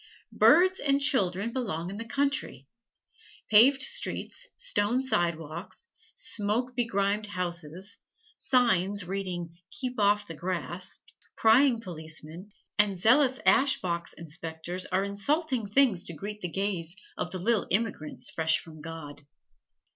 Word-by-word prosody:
Birds 375 +2 +5
and 280 -1 +2
children 210 -5 +1
belong 185 -9 -3
in 200 - -7
the 230 - -6
country. 275 - -2 0.8
Paved 260 +6 +6
streets, - - -2
stone 250 - 0
sidewalks, 170 - -2 0.3
smoke 245 +1 0
begrimed 210 -3 0
houses, 180 -1 -3 0.4
signs 205 -6 +2
reading, 175 -3 -4
"Keep 255 -5 -5
Off 205 0 +3
the 165 - -8
Grass", 180 +2 -4 0.4
prying 235 +2 +4
policemen, 160 0 -5 0.3
and 205 -2 +4
zealous 255 +7 +4
ash 275 0 +5
box 170 -1 -3
inspectors 165 +2 -6
are 190 +1 0
insulting 245 +5 -1
things 220 -6 +3
to 170 - -5
greet 210 +5 -7
the 180 - -3
gaze 185 -2 -2 0.2
of - - -3
the 185 - -5
little 205 +2 +1
immigrants 195 -6 -1
fresh 160 -1 +2
from 155 -2 -11
God. 150 -2 -9
200 Hz, 125 wpm, -28 LUFS, 170-245 Hz, 0.8 s, Paved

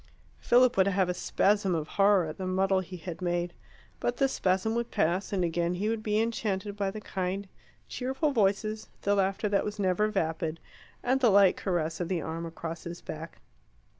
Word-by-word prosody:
Philip 250 -1 +4
would 190 0 +5
have 195 -2 +2
a - - +1
spasm 195 0 +1
of 155 -2 -3
horror 200 -3 +4
at 155 +3 -7
the 185 - -3
muddle 190 +1 +2
he 185 0 -7
had 175 0 -7
made. 175 0 -1 0.5
But 240 - -1
the 275 - +3
spasm 190 -2 0
would 235 0 -1
pass, 175 +5 0
and 190 -3 0
again 170 +1 0
he 205 +4 -1
would 225 -1 -1
be 215 0 +1
enchanted 210 -3 -1
by 200 -1 -1
the 215 +2 -6
kind, 195 -1 -3 0.4
cheerful 265 +4 -1
voices, 215 -1 0
the 200 - +2
laughter 195 +2 +1
that 200 -1 +2
was 210 0 -4
never 195 +1 +2
vapid, 165 -5 -2 0.4
and 260 +2 +2
the 245 -3 +5
light 200 -2 +6
caress 170 -4 -2
of 175 - -2
the 180 -1 -1
arm 165 +2 -4
across 165 0 -6
his 170 0 -6
back. 160 +1 -8
195 Hz, 195 wpm, -29 LUFS, 175-210 Hz, 0.5 s, light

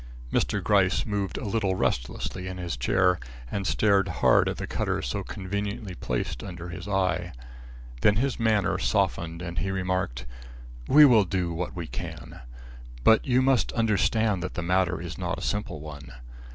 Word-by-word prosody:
Mr. - - +1
Gryce - - +3
moved 100 -5 -2
a - - -5
little 100 -2 0
restlessly 90 +6 -2
in 95 0 -5
his 85 -5 -3
chair 90 +8 +2 0.3
and 100 -2 -2
stared 100 -2 +3
hard 80 - +3
at - - -4
the - - -4
cutter - - -1
so - - -2
conveniently 100 +1 -4
placed 65 -8 -3
under 85 -2 -7
his 90 +1 -7
eye. 90 -3 0 0.7
Then 105 - +5
his 130 +4 0
manner 110 -3 +2
softened 85 +1 0
and 85 -3 -4
he 95 - -2
remarked: 90 -9 -2 0.6
"We 150 +1 +8
will 115 -6 +6
do 90 -3 -1
what 90 +3 -4
we 85 -2 -4
can. - - -7 0.6
But 110 - +5
you 130 0 +3
must 135 -2 +2
understand 110 -2 +1
that 95 - -5
the 85 - -2
matter 90 0 +1
is 85 +1 -7
not 90 -1 -2
a - - -7
simple 105 -6 -2
one. 70 -2 -9
95 Hz, 165 wpm, -26 LUFS, 85-105 Hz, 0.7 s, We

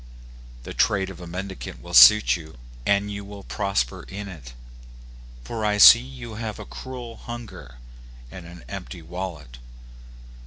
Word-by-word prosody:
The - - -8
trade 95 -2 +1
of 95 - -12
a 90 - -9
mendicant 95 -6 -7
will - - -11
suit - - +8
you, 80 -5 -11 0.3
and 100 +1 +1
you 100 0 -6
will 100 0 -11
prosper 100 -15 -2
in 100 +1 -7
it; 70 -11 -11 0.9
for 110 - -5
I 105 -1 +1
see 115 - +10
you 125 -3 -10
have 110 -1 -5
a - - -9
cruel 125 -3 -9
hunger, 120 - -9 0.6
and 85 -2 -10
an 85 0 -13
empty 95 -3 -8
wallet. 80 -8 -7
95 Hz, 150 wpm, -24 LUFS, 85-105 Hz, 0.9 s, see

